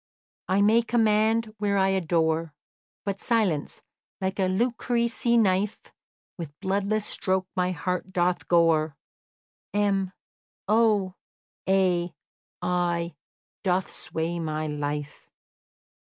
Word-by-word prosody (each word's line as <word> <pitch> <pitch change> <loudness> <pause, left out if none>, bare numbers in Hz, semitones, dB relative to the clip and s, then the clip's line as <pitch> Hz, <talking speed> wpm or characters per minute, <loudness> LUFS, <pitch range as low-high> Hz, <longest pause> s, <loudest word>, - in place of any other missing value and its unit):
"I 195 +2 +3
may 220 +3 +5
command 225 -1 +2
where 200 -1 +1
I 190 0 +3
adore; 165 -4 +1 0.5
But 200 -1 -3
silence, 205 -11 0 0.4
like 190 +1 -2
a 190 - +3
Lucrece 235 +3 0
knife, 200 -1 +1 0.5
With 150 -3 -7
bloodless 200 +2 0
stroke 190 -2 0
my 180 0 +1
heart 180 +1 -2
doth 180 0 0
gore, 160 -3 +3 0.8
M, 195 -2 +1 0.6
O, 210 -3 +3 0.6
A, 180 -2 +2 0.5
I, 175 -1 0 0.5
doth 185 0 +1
sway 165 +2 -3
my 155 -1 -2
life." 145 -1 -4
185 Hz, 100 wpm, -26 LUFS, 170-210 Hz, 0.8 s, may